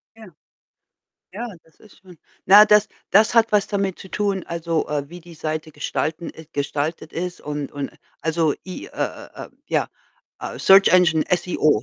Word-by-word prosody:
Ja. 225 -1 -13 1.1
Ja, 235 +4 -5 0.2
das 160 - -28
ist 215 - -19
schon 180 -3 -16 0.3
Na, 205 +2 +8
das 210 0 +4 0.2
das 215 +4 +4
hat 230 -1 +4
was 205 -1 +3
damit 195 -2 -2
zu 190 - -11
tun, 200 -3 -1
also, 170 -1 -2
äh, 145 -1 -2
wie 175 +2 -10
die 170 0 -14
Seite 155 0 -4
gestalten 155 +3 -3
ist 160 0 -13
gestaltet 145 +3 -3
ist 180 +1 -4
und 145 -1 -5
und 140 -1 -4 0.3
also, 160 -1 +1
I 185 - -7
äh - - -15 0.4
äh - - -8 0.2
ja, - - 0 0.5
äh - - -6
Search 195 +1 +7
Engine, 170 -4 +4
SEO, 155 -9 +1
170 Hz, 170 wpm, -22 LUFS, 155-195 Hz, 1.1 s, Na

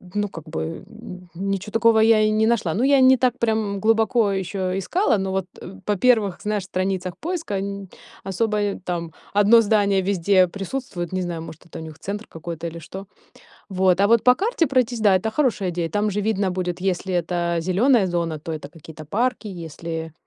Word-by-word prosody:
ну, 205 0 0
как 165 -4 -9
бы, 155 - -4 0.3
м, 185 -5 -11
ничё 195 +2 -3
такого 225 0 +4
я 220 -1 +5
и 215 0 +3
не 215 +1 +2
нашла. 215 -8 +1
Ну, 225 - 0
я 280 +1 +5
и - - +4
не 260 0 +6
так 250 0 +1
прям 220 -3 0
глубоко 225 0 +2
еще 190 0 -2
искала, 260 - +1
но 190 -1 -2
вот, 190 -1 -1 0.2
э, 190 +3 -10
по 210 - +1
первых, 220 -4 +2
знаешь, 210 -2 -2
страницах 185 -1 -2
поиска 330 - -3
нь 200 0 -5 0.4
особо, 210 +3 -1
э, 205 -1 -1
там 170 -2 -3 0.2
1 205 +3 +6
здание 200 -3 +2
везде 185 0 +3
присутствует. 195 -1 -5
Не 185 - -1
знаю, 175 -2 -4
может 160 +1 -11
это 170 - -10
у - - -7
них 160 -1 -10
центр 205 +5 -5
какой-то 165 0 -6
или 170 0 -7
что. 190 +4 -9 0.6
Вот, 185 -1 +2
а 200 - +5
вот 230 +1 +3
по 250 - +7
карте 390 - 0
пройтись- 250 -3 0
да, 205 -3 +5
это 220 +4 -3
хорошая 225 -8 0
идея. 170 -1 -2
Там 205 +5 0
же 205 +1 -1
видно 205 -2 0
будет, 180 -1 -3
если 185 0 -1
это 170 0 -1
зеленая 195 +6 +3
зона, 170 -3 -2
то 160 +2 -6
это 150 -3 -6
какие-то 155 0 -12
парки, 235 - -1
если 165 -2 -6
195 Hz, 200 wpm, -22 LUFS, 175-220 Hz, 0.6 s, по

